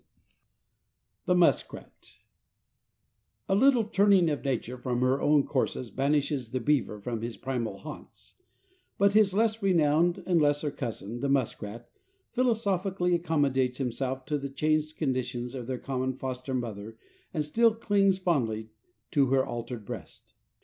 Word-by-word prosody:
XLI -, -, -42 dB, 1.2 s
THE 180 Hz, -, +4 dB
MUSKRAT 175 Hz, -1 st, 0 dB, 1.3 s
A -, -, +1 dB
little 250 Hz, +3 st, +5 dB
turning 200 Hz, -5 st, +4 dB
of 145 Hz, -, -3 dB
nature 125 Hz, -2 st, -2 dB
from 125 Hz, -1 st, -2 dB
her 130 Hz, +2 st, +2 dB
own 145 Hz, -1 st, +4 dB
courses 130 Hz, -3 st, -2 dB
banishes 140 Hz, -2 st, 0 dB
the 130 Hz, -, -2 dB
beaver 125 Hz, -5 st, 0 dB
from 115 Hz, +2 st, -4 dB
his 115 Hz, 0 st, -5 dB
primal 125 Hz, -4 st, -3 dB
haunts, -, -, -11 dB, 0.6 s
but 200 Hz, 0 st, +4 dB
his 205 Hz, -3 st, +4 dB
less 225 Hz, +1 st, +1 dB
renowned 170 Hz, -2 st, +2 dB
and 175 Hz, -3 st, +3 dB
lesser 145 Hz, 0 st, +1 dB
cousin, 115 Hz, -3 st, -5 dB
the 140 Hz, -, -1 dB
muskrat, 120 Hz, -4 st, -2 dB, 0.4 s
philosophically 200 Hz, -7 st, +1 dB
accommodates 140 Hz, -7 st, +1 dB
himself 130 Hz, 0 st, -3 dB
to 150 Hz, -2 st, -1 dB
the 140 Hz, 0 st, -5 dB
changed 155 Hz, +2 st, 0 dB
conditions 125 Hz, -3 st, -2 dB
of 125 Hz, -3 st, -6 dB
their 130 Hz, -1 st, -2 dB
common 130 Hz, 0 st, -2 dB
foster 130 Hz, 0 st, -4 dB
mother 110 Hz, -2 st, -5 dB, 0.3 s
and 155 Hz, -3 st, -1 dB
still 225 Hz, +8 st, +3 dB
clings 200 Hz, -4 st, +2 dB
fondly 115 Hz, -, -1 dB, 0.4 s
to 140 Hz, -2 st, +3 dB
her 130 Hz, 0 st, +2 dB
altered 120 Hz, -2 st, -6 dB
breast. -, -, -9 dB
140 Hz, 140 wpm, -28 LUFS, 125-175 Hz, 1.3 s, little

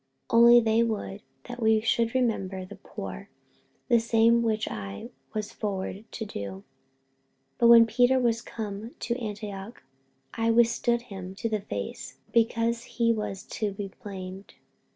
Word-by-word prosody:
48:002:010 230 Hz, -, +5 dB
Only 240 Hz, 0 st, +9 dB
they 225 Hz, 0 st, +3 dB
would 210 Hz, -3 st, -2 dB, 0.2 s
that 245 Hz, 0 st, -8 dB
we 220 Hz, -1 st, +4 dB
should 230 Hz, +1 st, +1 dB
remember 195 Hz, -7 st, 0 dB
the 205 Hz, +2 st, -10 dB
poor; -, -, -8 dB, 0.6 s
the 235 Hz, -2 st, +5 dB
same 230 Hz, +1 st, +4 dB
which 220 Hz, -2 st, 0 dB
I 100 Hz, -2 st, -5 dB
also 230 Hz, -, -8 dB, 0.3 s
was 215 Hz, -1 st, -3 dB
forward 200 Hz, 0 st, -4 dB
to 220 Hz, -, -5 dB
do. 205 Hz, -, -6 dB
48:002:011 95 Hz, 0 st, -10 dB, 1.0 s
But 235 Hz, -, +5 dB
when 235 Hz, -1 st, +9 dB
Peter 245 Hz, +3 st, +3 dB
was 235 Hz, -2 st, +1 dB
come 215 Hz, +1 st, -6 dB
to 235 Hz, -, -2 dB
Antioch, 210 Hz, 0 st, -6 dB, 0.5 s
I 230 Hz, 0 st, 0 dB
withstood 235 Hz, +1 st, +3 dB
him 190 Hz, -4 st, -8 dB
to 230 Hz, +3 st, -2 dB
the 215 Hz, -2 st, -1 dB
face, 200 Hz, -, -6 dB, 0.2 s
because 230 Hz, 0 st, +2 dB, 0.2 s
he 230 Hz, -1 st, +4 dB
was 210 Hz, -3 st, -4 dB
to 210 Hz, -2 st, -3 dB
be 195 Hz, 0 st, -6 dB
blamed. 190 Hz, -1 st, -8 dB
225 Hz, 155 wpm, -27 LUFS, 200-235 Hz, 1.0 s, Only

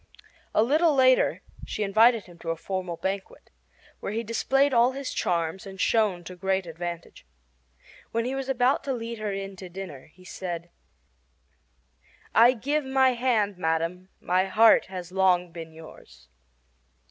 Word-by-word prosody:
A 215 Hz, -, +5 dB
little 305 Hz, +5 st, +3 dB
later 255 Hz, -1 st, +3 dB, 0.2 s
she 215 Hz, -, -3 dB
invited 220 Hz, +3 st, +4 dB
him 175 Hz, -2 st, -16 dB
to 165 Hz, -, -6 dB
a 165 Hz, -, 0 dB
formal 180 Hz, 0 st, -4 dB
banquet, 190 Hz, +3 st, -5 dB, 0.5 s
where -, -, -4 dB
he 225 Hz, +1 st, -2 dB
displayed 270 Hz, +5 st, +1 dB
all 240 Hz, +2 st, +4 dB
his 275 Hz, 0 st, -5 dB
charms 170 Hz, +2 st, -1 dB
and 190 Hz, -1 st, -10 dB
shone 205 Hz, -5 st, +1 dB
to 185 Hz, +2 st, -9 dB
great 190 Hz, +1 st, -1 dB
advantage. 170 Hz, 0 st, -7 dB, 0.9 s
When 230 Hz, 0 st, -1 dB
he 255 Hz, -, -2 dB
was 270 Hz, 0 st, -4 dB
about 255 Hz, +1 st, +2 dB
to 275 Hz, -, -1 dB
lead 230 Hz, -1 st, -5 dB
her 215 Hz, -1 st, -2 dB
in 195 Hz, 0 st, -5 dB
to 185 Hz, -1 st, -9 dB
dinner, 175 Hz, -7 st, -8 dB
he 185 Hz, +4 st, -21 dB
said: 175 Hz, -2 st, -6 dB, 1.6 s
"I 235 Hz, +3 st, +7 dB
give 285 Hz, +5 st, -1 dB
my 265 Hz, 0 st, +3 dB
hand, 235 Hz, -6 st, 0 dB
madam; 165 Hz, +2 st, -1 dB
my 185 Hz, +1 st, +1 dB
heart 215 Hz, +4 st, +5 dB
has 180 Hz, -2 st, -7 dB
long 180 Hz, -2 st, +2 dB
been 165 Hz, -1 st, -9 dB
yours." 160 Hz, 0 st, -15 dB
195 Hz, 155 wpm, -26 LUFS, 175-240 Hz, 1.6 s, I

